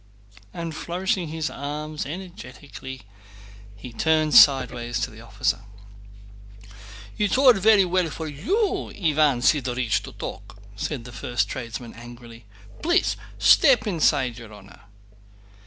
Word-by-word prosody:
And 165 +1 -6
flourishing 180 +1 -2
his 155 0 -4
arm 150 +2 -6
energetically 140 - -9 0.7
he 115 +4 -11
turned 155 +4 +1
sideways 125 -4 +5
to 125 - -2
the 110 0 -13
officer. 115 -1 -1 1.6
"It's 210 +3 +1
all 265 -2 +7
very 205 -1 +4
well 180 -1 0
for 160 +1 -6
you, 380 - -1
Iván 150 -8 +1
Sidórych, 125 -6 +1
to - - -10
talk," - - -8 0.2
said 125 +5 -4
the 125 - -9
first 120 -2 -2
tradesman 120 -2 -6
angrily. 120 -1 -13 0.4
"Please 345 +3 +2 0.2
step 270 -6 +5
inside, 145 - +1
your 115 -2 -12
honor!" 100 -2 -15
145 Hz, 120 wpm, -24 LUFS, 120-175 Hz, 1.6 s, all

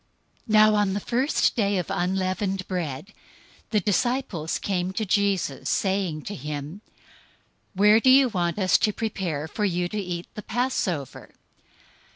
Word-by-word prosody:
026:017 - - -1
Now 215 0 +6
on 205 -2 +2
the 200 - -1
first 255 +7 +1
day 205 -3 +1
of 180 - -3
unleavened 185 +1 -1
bread, 175 0 -4 0.6
the 215 - +2
disciples 205 - -1
came 185 -2 -2
to 220 - -2
Jesus, 195 -8 0
saying 190 -6 0
to 205 - -6
him, 150 +4 -6 0.9
"Where 210 +3 +6
do 260 - +3
you 265 0 +7
want 175 -4 -1
us 185 -4 +3
to 210 - +1
prepare 185 -10 -3
for 210 - -4
you 180 -3 0
to 210 - -3
eat 180 -3 -4
the 210 - -7
Passover?" 215 - -3
195 Hz, 150 wpm, -25 LUFS, 175-215 Hz, 0.9 s, you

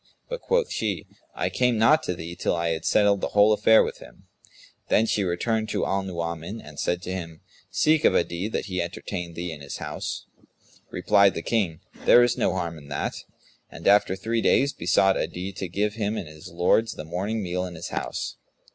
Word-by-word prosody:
But - - -4
quoth 485 -1 +1
she, - - -2 0.3
"I - - -1
came 125 -2 +2
not 145 +8 +5
to 90 - -2
thee, 85 +1 -7
till 85 - 0
I 85 0 0
had 80 +1 -3
settled 100 0 +3
the - - -3
whole 105 +1 +7
affair 110 +1 +5
with - - -5
him." - - -15 0.7
Then 110 - +4
she 105 -2 0
returned 110 +5 -1
to - - -1
Al 100 0 0
Nu'uman 85 +2 -4
and 75 -5 -11
said 90 0 -1
to 90 - -4
him, 85 -4 -6 0.3
"Seek 155 +11 +3
of - - +4
Adi 85 +3 0
that 110 - -3
he 90 -4 -2
entertain 85 0 -5
thee 85 0 -4
in 75 -2 -9
his 70 - -6
house." - - -5 0.6
Replied 100 -1 +3
the 85 - -4
King, 95 -9 0 0.2
"There 120 - +8
is 120 -1 +2
no - - +1
harm 85 -3 -3
in 70 - -14
that;" 70 - -2 0.6
and - - -7
after 100 -2 +5
three 115 +4 -1
days, 140 +5 +3
besought 95 +3 +3
Adi 90 +2 -3
to 95 0 -4
give 105 +4 0
him 105 0 -2
and 85 - -5
his 75 0 -11
lords 90 +6 +2
the 75 - -8
morning 100 +7 -2
meal 90 0 -2
in 90 - -9
his 80 - -6
house. - - -4
95 Hz, 205 wpm, -25 LUFS, 85-110 Hz, 0.7 s, There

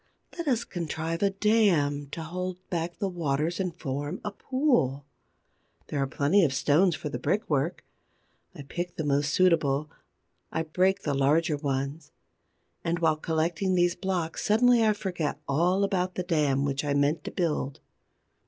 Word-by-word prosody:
Let 340 -3 -5
us 240 -4 +2
contrive 165 -2 -4
a 200 - +4
dam 195 -9 +2
to 160 +4 -6
hold 180 +2 -4
back 170 0 -2
the 200 - -1
waters 165 -1 -1
and 180 -4 -3
form 145 +5 -3
a 210 - -2
pool. 220 - 0 0.8
There 145 - -1
are 135 - +1
plenty 150 +9 +3
of 140 -4 +1
stones 155 +6 +3
for 150 - -5
the 125 - -4
brickwork. 155 - -1 0.7
I - - -8
pick 175 +5 -5
the 160 - -3
most 145 0 +1
suitable; 155 -5 +2 0.6
I 160 - -1
break 185 +5 +1
the 145 - 0
larger 150 +4 +2
ones. 140 +1 -3 0.7
And, 165 +1 0
while 160 -2 +2
collecting 165 +4 0
these 175 -1 +3
blocks, 175 -3 -2
suddenly 235 +2 +4
I 215 -1 +4
forget 175 -8 -3
all 175 +7 +2
about 185 -2 0
the 180 - -2
dam 150 -6 +1
which 140 0 -1
I 145 -1 0
meant 145 +2 +1
to - - -4
build. 150 -6 -1
165 Hz, 160 wpm, -27 LUFS, 145-185 Hz, 0.8 s, a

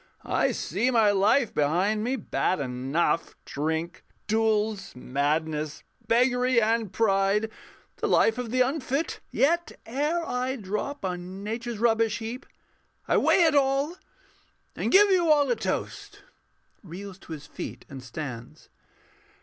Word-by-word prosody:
_] - - -31 0.2
I - - +1
see 210 - -1
my 225 -4 +4
life 210 +5 +3
behind 185 +9 +1
me: 250 +3 0
bad 185 - -1
enough 135 +6 -1
Drink, 160 +4 -3 0.2
duels, 215 - 0
madness, 150 +4 -2 0.2
beggary, 250 +1 +3
and 225 -2 +1
pride, 205 +1 +2 0.5
The - - -1
life 225 +2 +3
of 245 -2 -4
the 255 +2 +1
unfit: 275 +3 -1
yet 340 +5 +1
ere 300 +8 -1
I 255 +1 -1
drop 210 +4 -4
On 185 +1 -5
Nature's 230 +2 -4
rubbish 225 -1 +2
heap, 235 +4 -6 0.6
I - - +3
weigh 360 - +4
it 320 -2 +4
all, 280 +3 +2 0.8
And - - -2
give 405 +1 +6
you 350 -3 +3
all 290 -3 +4
a - - +3
toast - - -4 0.6
[_Reels 190 +2 -9
to 165 - -9
his 150 -2 -8
feet - - -8
and 135 -2 -9
stands. 125 -1 -8
220 Hz, 135 wpm, -26 LUFS, 175-255 Hz, 0.8 s, give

